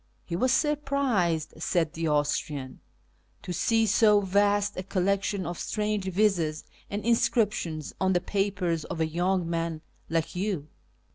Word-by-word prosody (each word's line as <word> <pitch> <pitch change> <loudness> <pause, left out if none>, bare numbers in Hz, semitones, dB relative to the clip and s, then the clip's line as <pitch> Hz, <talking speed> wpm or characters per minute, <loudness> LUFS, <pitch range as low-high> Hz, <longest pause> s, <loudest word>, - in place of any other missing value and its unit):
" - - -39
He 170 - -4
was 255 +8 +2
surprised," 270 - +1
said 165 -3 0
the 165 0 -2
Austrian, 145 -2 -1 0.6
"to 180 - -4
see 225 +6 +2
so 210 0 +5
vast 205 +1 +2
a - - -3
collection 195 +1 0
of 175 0 -5
strange 210 -2 -1
visas 185 -5 +1 0.3
and 205 +1 -4
inscriptions 210 - +1
on 190 0 +3
the 175 - +3
papers 185 -4 -1
of 170 0 -6
a 160 - +2
young 175 +2 0
man 165 -1 -2 0.3
like 165 +1 -1
you." 180 -6 -2
185 Hz, 145 wpm, -27 LUFS, 165-205 Hz, 0.6 s, so